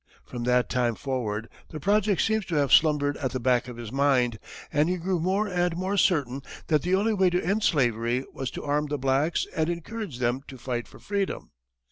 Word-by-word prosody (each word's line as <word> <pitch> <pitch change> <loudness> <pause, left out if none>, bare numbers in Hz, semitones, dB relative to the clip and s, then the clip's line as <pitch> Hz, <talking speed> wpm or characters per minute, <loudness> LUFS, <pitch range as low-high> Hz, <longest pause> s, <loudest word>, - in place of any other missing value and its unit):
From 120 -1 -5
that 125 0 +3
time 120 -2 0
forward, 115 -5 -3 0.2
the 155 - -7
project 200 +2 +2
seems 220 -1 +1
to 165 - -2
have 140 -2 +2
slumbered 145 -2 +4
at 130 -1 -3
the 130 - -1
back 125 0 +2
of 125 -2 -8
his 115 -2 -7
mind, 130 -5 +2 0.3
and 150 +3 +3
he 180 - 0
grew 180 +1 -1
more 190 +5 +1
and 175 -2 0
more 190 +2 -1
certain 145 -9 +2 0.3
that 155 -3 +3
the 180 +4 +1
only 215 +3 +2
way 190 -3 +3
to 180 +1 0
end 200 +5 +1
slavery 120 - +1
was 135 -2 -4
to - - -7
arm 150 +1 0
the 145 0 -2
blacks 135 +5 +1
and 160 0 +1
encourage 175 - -5
them 125 +1 0
to 130 - -9
fight 120 -1 -4
for - - -15
freedom. 200 -1 -3
145 Hz, 210 wpm, -26 LUFS, 125-180 Hz, 0.3 s, slumbered